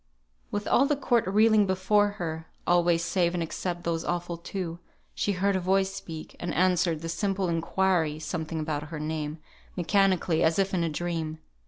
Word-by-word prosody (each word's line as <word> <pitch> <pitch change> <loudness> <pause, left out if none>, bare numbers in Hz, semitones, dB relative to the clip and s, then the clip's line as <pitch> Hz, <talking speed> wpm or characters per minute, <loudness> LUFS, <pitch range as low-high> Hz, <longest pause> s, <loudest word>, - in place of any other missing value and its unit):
With 205 0 -3
all 275 - +4
the 295 - +2
court 240 -6 +1
reeling 215 +1 +4
before 190 +2 +3
her 160 -3 -4 0.2
(always 175 -1 +3
save 175 0 +1
and 170 - 0
except 175 +1 -4
those 165 -1 -1
awful 175 0 -2
two), 170 0 -5 0.3
she 205 - 0
heard 195 +2 +1
a - - +2
voice 190 +1 +1
speak, 160 -4 -8
and 175 - -3
answered 180 -3 +2
the 165 - -4
simple 195 +2 -1
inquiry 165 -1 +1
(something 160 0 -4
about 150 -1 -3
her 160 -2 -5
name) 155 0 -3 0.4
mechanically, 185 -2 +2
as 160 0 +3
if 195 0 +1
in 175 -2 +1
a 165 - 0
dream. 160 -1 -3
175 Hz, 175 wpm, -27 LUFS, 165-190 Hz, 0.4 s, all